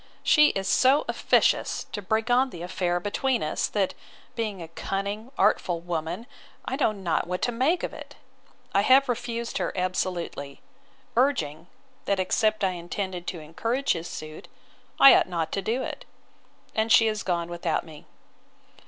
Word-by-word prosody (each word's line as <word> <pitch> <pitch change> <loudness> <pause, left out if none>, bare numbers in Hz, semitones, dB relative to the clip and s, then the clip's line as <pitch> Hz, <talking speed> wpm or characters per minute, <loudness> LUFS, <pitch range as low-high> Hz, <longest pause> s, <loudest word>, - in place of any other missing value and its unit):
She 300 -1 +6
is 195 0 -3
so 265 +7 +4
officious - - +2
to 205 - -4
bring 220 +4 0
on 255 +2 +4
the 170 -7 -8
affair 175 -1 -1
between 235 +5 -1
us, 155 - -1
that, 200 -3 0 0.4
being 215 -4 -3
a 165 - -7
cunning, 200 +7 -4
artful 175 -2 +2
woman, 170 +4 -4 0.4
I 260 - -2
know 270 -5 +2
not 185 -6 -1
what 180 +1 -3
to 245 - +1
make 270 +9 +1
of - - -3
it: - - -10 0.6
I 200 - +4
have 265 +5 +5
refused 235 -1 -3
her - - -1
absolutely; 180 -6 -3 0.6
urging, 225 - +1 0.4
that 200 -1 0
except 215 +3 +1
I 190 - +3
intended 180 +1 -5
to 175 - -4
encourage 230 - -1
his 170 0 -5
suit, 155 0 -8 0.5
I 275 - +10
ought - - +3
not 165 -3 -2
to 195 - -1
do 235 +7 -1
it. - - -6 0.7
And 220 +1 0
she 225 - +7
is 215 -1 -1
gone 170 -2 -1
without 170 -2 -1
me. 155 -2 -13
195 Hz, 160 wpm, -26 LUFS, 175-235 Hz, 0.7 s, I